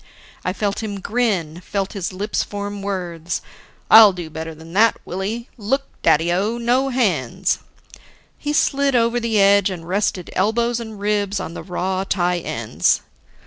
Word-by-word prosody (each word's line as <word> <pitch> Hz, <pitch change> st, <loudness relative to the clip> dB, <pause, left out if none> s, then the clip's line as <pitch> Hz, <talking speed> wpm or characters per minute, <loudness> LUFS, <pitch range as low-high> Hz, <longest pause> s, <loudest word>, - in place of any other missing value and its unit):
I 185 Hz, -, 0 dB
felt 200 Hz, +2 st, -2 dB
him 205 Hz, -2 st, -4 dB
grin, 190 Hz, -7 st, -1 dB
felt 195 Hz, +1 st, -3 dB
his 195 Hz, -3 st, -3 dB
lips 200 Hz, +3 st, -2 dB
form 205 Hz, 0 st, -5 dB
words: 175 Hz, -4 st, -3 dB, 0.5 s
"I'll 215 Hz, -3 st, +10 dB
do 175 Hz, -3 st, -7 dB
better 160 Hz, +1 st, -6 dB
than 160 Hz, +2 st, -12 dB
that, 225 Hz, +3 st, +4 dB
Willie. 210 Hz, +6 st, -4 dB
Look, 265 Hz, +7 st, 0 dB, 0.2 s
Daddy 165 Hz, +3 st, +3 dB
o, 210 Hz, +6 st, 0 dB
no 245 Hz, +3 st, +1 dB
hands!" 185 Hz, -, 0 dB, 0.8 s
He 295 Hz, -, -2 dB
slid 280 Hz, -2 st, +2 dB
over 235 Hz, 0 st, +3 dB
the 230 Hz, -2 st, +1 dB
edge 200 Hz, 0 st, +5 dB
and 170 Hz, -3 st, -7 dB
rested 190 Hz, -1 st, -1 dB
elbows 235 Hz, +4 st, +1 dB
and 220 Hz, -3 st, -8 dB
ribs 205 Hz, -1 st, 0 dB
on 165 Hz, -, -5 dB
the -, -, -6 dB
raw 185 Hz, +1 st, -2 dB
tie 180 Hz, -2 st, 0 dB
ends. 110 Hz, -, 0 dB
200 Hz, 155 wpm, -21 LUFS, 180-225 Hz, 0.8 s, I'll